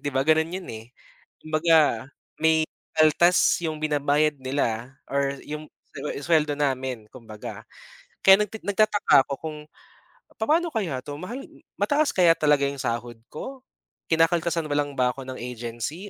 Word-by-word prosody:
'di - - -3
ba, 135 - +2
ganun 160 +3 +2
yun, 185 0 -5
eh. 115 +2 -10 0.5
Kumbaga 155 -3 +3 0.3
may 160 0 +4 0.3
kaltas 160 +3 +4
yung 155 -1 -4
binabayad 150 0 +1
nila 130 -2 -2 0.2
or 140 0 0
yung 150 +1 -6 0.3
su - - -8 0.3
suweldo 155 -2 +3
namin, 130 -6 -2
kumbaga. 110 -4 -10 0.6
Kaya 195 +1 +8
nag 210 -2 0
nagtataka 205 -8 +3
ako 140 - -2
kung 155 -1 -6 0.8
papaano 320 +8 +1
kaya 180 - -2
'to, 145 - -6
mahal 230 +8 -6 0.4
mataas 295 0 +2
kaya 175 -3 +5
talaga 150 -3 +3
yung 140 -1 -5
sahod 120 0 -3
ko? 265 - -8 0.5
Kinakaltasan 165 0 +2
ba 145 - -2
lang 145 -1 -1
ba 125 -1 +2
ako 135 - -8
ng 130 - -6
agency 120 - -6
150 Hz, 145 wpm, -25 LUFS, 130-170 Hz, 0.8 s, Kaya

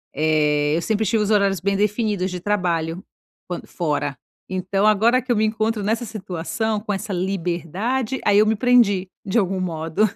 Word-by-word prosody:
Eh, 150 -1 +2
eu 170 - -1
sempre 220 +3 0
tive 220 0 +1
os 205 - -2
horários 200 -4 +2
bem 200 +2 0
definidos 205 -2 0
de 180 - -4
trabalho, 175 -3 -1 0.4
quando 175 - -6
fora. 150 -5 -2 0.3
Então, 190 +2 0
agora 230 +5 +4
que 250 0 -4
eu - - +3
me 215 +1 +2
encontro 220 -1 -1
nessa 225 +3 0
situação, 210 +1 -3
com 210 0 -5
essa 195 +1 -4
liberdade, 190 - -2
aí 205 0 +5
eu 215 - +5
me 220 - +2
prendi, 210 -6 +3 0.2
de 195 +4 -1
algum 190 -2 +1
modo. 165 +3 0
200 Hz, 175 wpm, -22 LUFS, 175-220 Hz, 0.4 s, aí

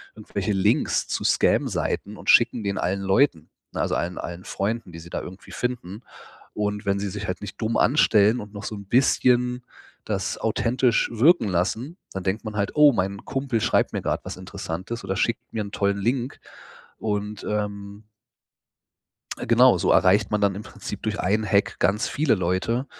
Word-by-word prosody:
irgendwelche 100 +1 -3
Links 95 -1 +1
zu - - -2
Scam - - +3
Seiten 105 +2 -2
und - - -6
schicken 120 -1 +5
den 100 0 -2
allen 95 +2 -1
Leuten, 95 - +2 0.2
ne? - - -2
Also - - 0
allen 90 +1 -2
allen 85 +1 -6
Freunden, 105 -2 -3
die 80 - -8
sie 85 +1 -12
da - - -3
irgendwie 95 +2 -11
finden. 120 -4 -4 0.5
Und 105 0 -2
wenn 100 0 +1
sie 100 0 -2
sich 100 +1 -5
halt 95 - -4
nicht 105 +2 -8
dumm 110 +1 0
anstellen 110 -4 +4
und 105 0 -9
noch 100 0 -8
so 110 - -5
'n 100 -1 -9
bisschen 125 +1 +2 0.4
das - - -2
authentisch 120 0 +1
wirken 120 - +4
lassen, 110 - -1 0.2
dann 95 -1 -4
denkt 100 +4 -2
man 110 -1 -5
halt: 100 -1 0
„Oh, 150 -2 +7
mein 100 -1 -2
Kumpel 135 -4 -1
schreibt - - +2
mir - - -3
gerade - - -2
was - - -6
Interessantes 95 +8 -6
oder 95 - -3
schickt 115 - 0
mir 110 - -2
'n 100 - -9
tollen 100 0 +1
Link“ 120 +5 -1 0.6
und, 105 -1 -3
ähm 100 0 -4 1.3
genau, - - +5
so - - +2
erreicht 100 +2 +4
man 105 - 0
dann 100 -2 +2
im 105 - -6
Prinzip - - -8
durch - - -2
1 105 +4 +1
Hack 100 +1 +1
ganz 100 +6 +1
viele 140 -2 +2
Leute, 95 +8 -1
105 Hz, 185 wpm, -24 LUFS, 95-115 Hz, 1.3 s, Oh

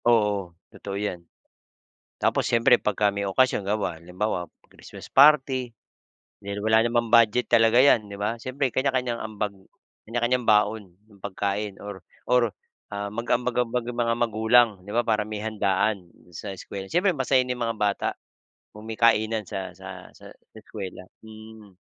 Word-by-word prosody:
Oo. 105 -7 +1 0.2
Totoo 100 -1 -6
'yan. 100 -4 -3 1.0
Tapos - - +1
siyempre 115 0 +4
pagka 105 0 0
may 100 0 -2
okasyon 105 +2 +1
bawa 100 -4 -2
halimbawa, 90 +3 -3 0.2
Christmas - - -13
party. 135 -3 +4 0.7
Dahil 100 0 -5
wala 110 0 +4
namang 120 0 0
budget 115 +1 +4
talaga 115 +2 +5
'yan, 125 -6 +4
'di 100 - -7
ba? 105 +3 -1
Siyempre, 130 +3 -2
kanya-kanyang 130 -3 0
ambag. 105 -2 -4 0.5
Kanya-kanyang 120 +2 0
baon 105 -3 +2
ng 100 -2 -21
pagkain 100 0 -3
or 100 -3 -8 0.3
or, 125 -2 +3 0.4
ah, 100 0 -3
mag-ambag-ambag 120 +1 -1
ang 120 0 -6
mga 115 0 +1
magulang, 115 +1 +4 0.2
di 100 - -10
ba? 120 - +3
Para 110 -2 +1
may 110 -1 -5
handaan 100 -3 -1 0.2
sa 100 - -6
eskuwela. 95 +1 -8
Siyempre 180 +1 +2
masaya 130 0 +2
din 125 - -2
mga 115 -1 -2
bata 105 -1 0 0.7
kung 105 - -11
may 110 - -6
kainan 110 -1 +3
sa 95 -1 -5
sa 95 0 -10
sa - - -14
sa - - -36
eskuwela, 95 -4 -8 0.2
mm. 110 -2 -13
110 Hz, 150 wpm, -25 LUFS, 100-120 Hz, 1.0 s, talaga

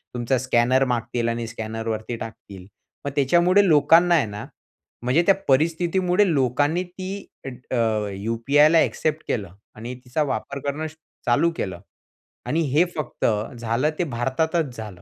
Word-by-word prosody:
तुमचा 120 +2 0
स्कॅनर 130 +1 +2
मागतील 120 -1 -1
आणि 115 0 -3
स्कॅनरवरती 110 0 -4
टाकतील. 100 -5 -9 0.4
मग 140 - -2
त्याच्यामुळे 175 +8 +4
लोकांना 165 +3 +5
आहे 150 -7 +3
ना, 105 0 -7 0.6
म्हणजे 130 +7 +3
त्या 195 - +6
परिस्थितीमुळे 175 +7 +2
लोकांनी 145 +5 +1
ती 185 +1 -8 0.3
अ, - - -3 0.3
अ, 110 -3 +1
यू-पी-आयला 130 +10 +3
ॲक्सेप्ट 155 0 0
केलं 100 -7 -2 0.2
आणि 120 +4 -7
तिचा 140 +5 0
वापर 140 0 -3
करणं 150 +3 -2
स 155 - -12 0.3
चालू 145 +8 +3
केलं. 95 -3 -4 0.7
आणि 165 - 0
हे 155 +6 +4
फक्त 150 -5 -3 0.3
झालं 115 +5 0
ते - - +3
भारतातच 135 +2 -1
झालं. 105 -6 -8
130 Hz, 140 wpm, -23 LUFS, 115-160 Hz, 0.7 s, त्या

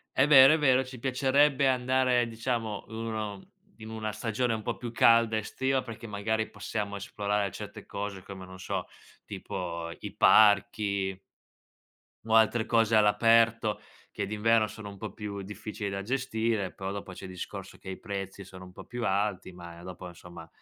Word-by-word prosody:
È 130 - +4
vero, 135 -1 +9
è 160 - +2
vero, 130 -3 +4
ci 130 -1 -10
piacerebbe 135 +2 +3
andare 130 -1 +2
diciamo 115 -2 -3
1 110 -3 -4 0.4
in 110 -1 -10
una 110 -1 -4
stagione 115 +3 -1
un 110 - -3
po' 120 +2 -3
più 120 -1 -6
calda 115 -1 +4
estiva, 130 +5 -1
perché 115 -2 -9
magari 110 +1 -2
possiamo 100 0 -4
esplorare 100 0 -2
certe - - -9
cose, 100 -1 -5
come 95 0 -9
non 95 0 -12
so, 95 - -3 0.4
tipo 85 -2 -5
i - - -7
parchi 100 -2 +4 1.1
o 110 - -1
altre 110 0 +4
cose 115 -1 +3
all'aperto 115 +1 +4 0.3
che 100 - -3
d'inverno 110 +2 +2
sono 105 -1 -9
un 100 - -11
po' 110 -1 -6
più 100 -1 -6
difficili 105 +1 -6
da 100 0 -4
gestire, 115 -4 -1
però 95 0 -5
dopo 100 -1 -6
c'è 95 - -9
il 95 - -8
discorso 95 +1 -8
che 95 - -9
i 95 - -6
prezzi 100 -1 -6
sono 95 0 -12
un 90 - -13
po' - - -12
più 120 0 -5
alti, 100 -1 -1
ma 85 -1 -11
dopo 90 0 -8
insomma, 85 -1 -11
105 Hz, 170 wpm, -29 LUFS, 100-115 Hz, 1.1 s, vero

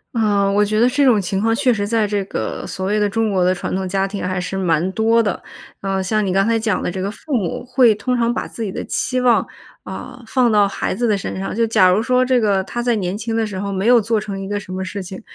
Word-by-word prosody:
啊， 205 -3 +2
我 205 +1 +3
觉 215 +1 -1
得 235 +3 +4
这 280 +2 +2
种 225 -5 +4
情 190 +1 -2
况， 225 +2 +1
确 255 -1 +2
实 205 -1 -2
在 225 -1 +1
这 205 0 -1
个 - - -4
所 190 -1 -4
谓 210 +2 +1
的 210 - +2
中 220 +1 0
国 185 -2 +2
的 185 +1 +2
传 - - -4
统 190 0 -2
家 195 +1 0
庭 200 +1 -5
还 185 -1 -2
是 190 +1 -4
蛮 175 -1 +1
多 225 +2 +2
的。 205 - -2 0.4
呃， 195 -1 -2
像 215 +2 0
你 185 - -1
刚 195 +1 +3
才 230 0 +2
讲 220 -4 -1
的 - - -1
这 190 - -4
个 195 - -2
父 290 +8 -7
母 210 -3 -1
会 250 -3 +4
通 250 +4 -1
常 235 0 +1
把 - - -3
自 230 - -9
己 215 - -2
的 - - -4
期 255 -1 -1
望， 245 -2 +3 0.4
啊， 250 - -8
放 245 -1 +2
到 205 -2 +4
孩 195 - -3
子 240 +5 -1
的 210 -2 +2
身 190 - -5
上， 195 - -4
就 230 - +2
假 190 -4 +4
如 195 +5 +2
说 255 +1 +2
这 255 -2 +2
个 200 -3 +2
他 240 - -4
在 240 -1 +2
年 190 +1 -2
轻 225 +1 -4
的 220 -1 0
时 200 - -6
候 200 +1 -3
没 195 +3 -1
有 245 -1 +6
做 225 +1 0
成 200 -1 -5
一 195 0 -6
个 205 - -1
什 185 -2 -9
么 190 - -3
事 195 +2 -5
情， 190 +2 -8
210 Hz, 310 characters per minute, -19 LUFS, 195-230 Hz, 0.4 s, 有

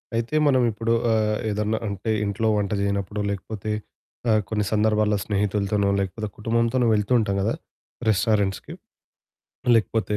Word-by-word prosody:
అయితే 115 +6 -1
మనం 130 -2 +4
ఇప్పుడు 115 +2 -1 0.2
ఆహ్, 110 -1 +1
ఏదన్నా 105 +1 -1
అంటే 100 +2 -4 0.2
ఇంట్లో 110 +3 -1
వంట 100 -1 -1
చేయనప్పుడు, 100 +1 -2
లేకపోతే 105 +2 -4 0.6
ఆహ్, 110 -1 +4
కొన్ని 105 -2 0
సందర్భాల్లో 105 -1 +2
స్నేహితులతోనో, 100 0 0
లేకపోతే 100 +3 -3
కుటుంబంతోనో 115 +2 +1
వెళ్తూ 105 +4 0
ఉంటాం 100 -3 0
గదా! 110 +4 +1 0.6
రెస్టారెంట్స్‌కి. 105 -2 +1 1.0
లేకపోతే 110 -1 0
105 Hz, 125 wpm, -24 LUFS, 100-110 Hz, 1.0 s, మనం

